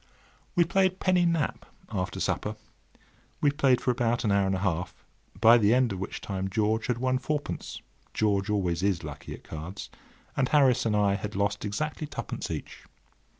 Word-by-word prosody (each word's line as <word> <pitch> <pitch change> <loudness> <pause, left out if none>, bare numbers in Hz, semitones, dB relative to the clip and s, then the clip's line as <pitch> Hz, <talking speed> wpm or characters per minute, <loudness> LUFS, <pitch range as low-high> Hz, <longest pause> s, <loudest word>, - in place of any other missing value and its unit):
We 175 - +6
played 185 +2 +1
penny 180 -2 +3
nap 165 -3 0 0.3
after - - -2
supper. - - -1 0.8
We 145 - +3
played 135 -4 +3
for 125 - +1
about 120 -1 0
an 105 - +1
hour 100 -1 +3
and 95 - +1
a 95 +2 -2
half, 90 0 -2 0.3
by 115 +3 +7
the 105 +2 +4
end 125 -3 +3
of 95 - -5
which 95 - -5
time 95 -1 -3
George 110 +2 0
had 125 - 0
won 130 +1 +1
fourpence—George 110 -8 -3
always 90 -5 0
is 95 -3 +1
lucky - - -7
at - - -17
cards—and 90 - -6
Harris 135 -6 +4
and 105 - +1
I 100 -1 +3
had 105 +1 -4
lost 100 +1 0
exactly 150 +9 -3
twopence - - -5
each. - - -6
110 Hz, 170 wpm, -28 LUFS, 100-135 Hz, 0.8 s, by